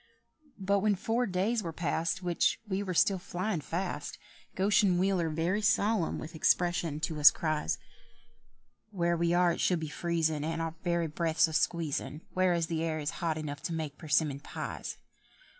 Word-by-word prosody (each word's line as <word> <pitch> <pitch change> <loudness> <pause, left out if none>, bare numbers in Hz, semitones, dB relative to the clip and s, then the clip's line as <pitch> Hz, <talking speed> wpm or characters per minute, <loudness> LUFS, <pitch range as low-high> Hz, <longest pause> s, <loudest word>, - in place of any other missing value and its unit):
But 200 0 +1
when 205 +1 +2
four 230 +6 0
days 200 +5 0
were 170 -4 -4
past, 170 +3 -1
Which 175 -1 +1
we 190 -1 -1 0.2
still 195 +3 +4
were - - -11
flyin' 180 -1 -2
fast, 170 -2 -4 0.4
Goshen 195 -1 +3
Wheeler, 185 -3 +1
very 170 +6 0
solemn, 205 -2 +2
with 160 - -7
expression 170 -1 +1
to 160 -2 -2
us 150 - +10
cries, 155 - -1 1.1
"Where 170 -4 0
we 170 0 +1
are 175 -1 +4
it - - -3
should 180 -2 +2
be 160 -1 -4
freezin' 160 -2 -1
And 165 +1 -2
our 165 -1 -2
very 170 -1 +1
breaths 160 +1 +1
a 160 - -7
squeezin', 155 -2 -1
Whereas 180 -2 +2
the 165 -1 -2
air 160 -1 -1
is 150 0 -2
hot 165 -2 0
enough 145 -2 -5
to 165 - -3
bake 155 -3 -4
persimmon 150 -3 +1
pies. - - -6
170 Hz, 170 wpm, -30 LUFS, 160-185 Hz, 1.1 s, us